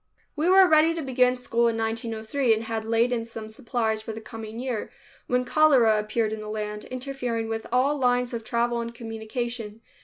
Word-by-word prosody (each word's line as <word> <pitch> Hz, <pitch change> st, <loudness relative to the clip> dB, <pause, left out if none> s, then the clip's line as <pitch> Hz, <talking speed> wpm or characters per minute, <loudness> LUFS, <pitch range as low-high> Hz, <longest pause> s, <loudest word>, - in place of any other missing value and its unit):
We 315 Hz, +4 st, +1 dB
were 380 Hz, 0 st, +7 dB
ready 320 Hz, 0 st, +4 dB
to 330 Hz, -, -3 dB
begin 255 Hz, -1 st, +3 dB
school 235 Hz, -1 st, +1 dB
in 230 Hz, -1 st, 0 dB
1903 225 Hz, +2 st, 0 dB
and 220 Hz, -, -4 dB
had 225 Hz, -1 st, -3 dB
laid 230 Hz, +2 st, +2 dB
in 230 Hz, -2 st, -1 dB
some 225 Hz, -1 st, -8 dB
supplies 225 Hz, -2 st, -1 dB
for 220 Hz, 0 st, -6 dB
the 220 Hz, -, -6 dB
coming 220 Hz, 0 st, -8 dB
year, 245 Hz, -3 st, -3 dB, 0.4 s
when 250 Hz, 0 st, +1 dB
cholera 250 Hz, -7 st, +4 dB
appeared 215 Hz, +1 st, -1 dB
in 220 Hz, -, -5 dB
the 215 Hz, -, -7 dB
land, 210 Hz, 0 st, -4 dB
interfering 250 Hz, -3 st, -3 dB
with 225 Hz, 0 st, -4 dB
all 275 Hz, +4 st, +2 dB
lines 245 Hz, -1 st, +1 dB
of 230 Hz, -1 st, -4 dB
travel 235 Hz, +1 st, 0 dB
and 235 Hz, 0 st, -6 dB
communication. 225 Hz, -1 st, -5 dB
235 Hz, 190 wpm, -26 LUFS, 220-250 Hz, 0.4 s, were